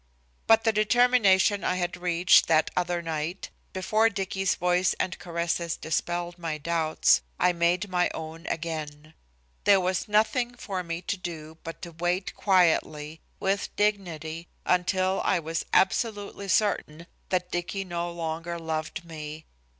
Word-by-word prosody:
But 225 0 +6
the 225 - +3
determination 215 -3 +4
I 185 - +1
had 175 -1 -2
reached 175 0 +4
that 160 -1 +3
other 175 -1 0
night, 165 +3 -4 0.2
before 215 +4 +2
Dicky's 195 -2 -1
voice 180 +1 +2
and 185 - -3
caresses 170 0 -2
dispelled 175 +2 -2
my 165 -2 -3
doubts, 160 +1 +2 0.2
I 180 - +4
made 175 +3 +1
my 180 -2 +1
own 160 +1 -7
again. 155 -2 -5 0.5
There 200 -1 +6
was 185 +2 -1
nothing 220 +4 +1
for 195 -6 -4
me 170 0 -5
to 205 - -2
do 160 -3 -7
but 165 - -8
to 170 - -6
wait 175 +3 -2
quietly, 160 -5 +2 0.2
with 195 +1 0
dignity, 170 -6 -1 0.2
until 185 +1 +1
I - - +2
was 165 0 -3
absolutely 200 0 +1
certain 185 -5 0 0.2
that 180 -1 -1
Dicky 185 +3 -3
no 175 -1 -3
longer 165 0 -4
loved 160 0 -4
me. 155 -1 -8
175 Hz, 140 wpm, -27 LUFS, 165-190 Hz, 0.5 s, But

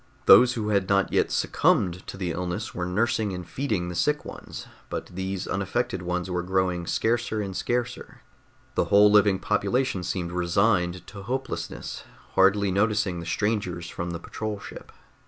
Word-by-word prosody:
Those 125 0 +8
who 110 -3 -2
had 100 -2 +1
not 100 -1 +2
yet - - +3
succumbed 90 0 +1
to - - -7
the 90 -3 -2
illness 90 +1 -3
were 90 0 -3
nursing 105 +1 0
and 90 -1 -6
feeding 110 -10 -2
the 90 - -4
sick 150 - 0
ones, - - -8 0.2
but - - -4
these 95 +1 -3
unaffected 100 +1 -2
ones 90 0 -2
were 90 -1 -1
growing 90 -1 0
scarcer 115 -1 0
and 100 -3 -4
scarcer. 120 +2 -3 0.5
The - - +1
whole 105 +1 +6
living 105 -2 +5
population 120 +1 0
seemed 90 -1 -3
resigned 90 0 +1
to 100 0 -10
hopelessness, 130 +6 -4 0.3
hardly 100 +1 +4
noticing 105 -2 +1
the 85 - -7
strangers 95 -4 -1
from 85 +1 -4
the 85 - -3
patrol 105 +3 -5
ship. - - -10
95 Hz, 160 wpm, -26 LUFS, 90-110 Hz, 0.5 s, Those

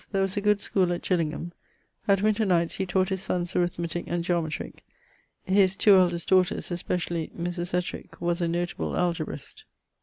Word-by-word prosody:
There 195 -1 +1
was 195 0 -2
a 205 - 0
good 210 0 +3
schoole 185 -3 +1
at 175 - -5
Gillingham: 170 -1 -1 0.6
at 200 -1 +3
winter 215 +1 +2
nights 170 -4 +1
he 190 - -2
taught 185 +1 +1
his 190 -1 -1
sonnes 175 -2 -2
Arithmetic 175 -1 -1
and 175 0 -1
Geometric; 170 -3 -2 0.6
his 190 0 +3
2 200 0 +6
eldest 175 -2 +2
daughters, 185 -1 +2
especially 175 -2 -2
Mris 175 0 -3
Ettrick, 180 0 -4
was 175 +1 -1
a 170 - +1
notable 175 +1 -2
Algebrist. 170 -5 -3
175 Hz, 170 wpm, -26 LUFS, 170-190 Hz, 0.6 s, 2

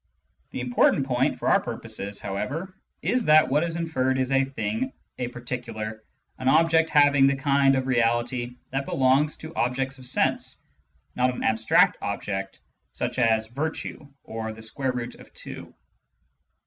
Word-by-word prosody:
The - - -5
important 125 +2 +3
point, 130 0 +1
for - - -4
our - - +5
present - - -5
purpose, 100 +1 -5
however, 145 - -4 0.3
is 250 -1 +1
that 155 0 +6
what 150 +4 +2
is 165 -1 -2
inferred 130 -6 0
is 130 0 0
a 135 0 +3
"thing," 110 -2 -3 0.3
a 125 - -1
"particular," 115 -3 -5 0.4
an 130 - -3
object 160 +2 +4
having 145 -2 +5
the 140 - +2
kind 140 -1 +3
of 130 -1 0
reality 120 0 0 0.2
that 135 +1 -2
belongs 135 +3 +2
to 160 +1 -9
objects 130 +2 -1
of 130 - -5
sense, 130 - 0 0.6
not 125 0 +2
an 125 - -6
abstract 110 0 +3
object 95 -1 -4 0.3
such - - -3
as 110 -2 +3
virtue 145 +4 -4 0.2
or 110 0 -5
the 110 0 -10
square 130 +4 -2
root 125 -1 -4
of - - -15
two. - - -7
130 Hz, 160 wpm, -25 LUFS, 120-140 Hz, 0.6 s, that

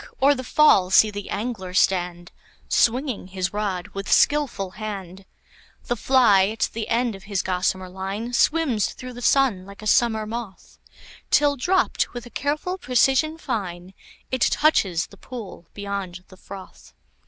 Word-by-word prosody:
o'er 275 +2 +5
the 260 -2 -5
fall 235 -9 +4
see 215 +3 +5
the 205 -1 -7
angler 200 -4 -4
stand, 175 -2 +1 0.4
Swinging 245 -3 +1
his 185 0 -3
rod 200 -3 -3
with 195 0 -6
skilful 260 -11 +2
hand; 195 -2 -7 0.6
The 240 - -1
fly 225 -6 +4
at 220 +2 -1
the 225 -1 -4
end 235 0 0
of 195 -1 -12
his 200 -2 -2
gossamer 185 0 -1
line 195 +6 -5
Swims 270 -5 +1
through 255 0 -9
the 245 - -9
sun 250 -8 +2
like 200 +2 -12
a - - -8
summer 220 0 +2
moth, 220 -3 -8 0.5
Till, 290 -1 +3
dropt 360 0 0
with 240 0 -6
a 240 - -12
careful 305 - -2
precision 270 +4 +2
fine, 190 - -5 0.4
It 260 -2 -2
touches 190 - +2
the - - -17
pool 215 -9 -9
beyond 200 -3 -5
the 185 - -15
froth. 190 0 -12
215 Hz, 155 wpm, -23 LUFS, 190-250 Hz, 0.6 s, o'er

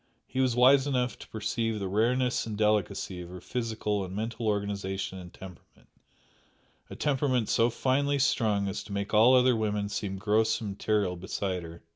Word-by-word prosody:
He 130 - -5
was 130 -3 +2
wise 135 +3 +5
enough 125 -3 -1
to - - -11
perceive 110 +1 -2
the 100 -2 -3
rareness 120 +6 +1
and 105 -2 -4
delicacy 105 -3 0
of 85 - -9
her 90 0 -8
physical 110 -2 -2
and 95 0 -7
mental 115 +2 -3
organisation 100 -2 -2
and 90 -1 -10
temperament, 95 -2 -14 1.0
a - - -8
temperament 130 -5 0
so 115 +1 +3
finely 140 +4 +1
strung 110 -7 +1
as 95 - -4
to 105 - -8
make 100 +1 -3
all 115 +4 +6
other 125 -1 +5
women 105 -2 -1
seem 100 -2 -3
gross 110 +2 +2
and 105 -3 -4
material 100 -2 0
beside 95 0 -3
her. 85 0 -11
105 Hz, 175 wpm, -28 LUFS, 100-125 Hz, 1.0 s, all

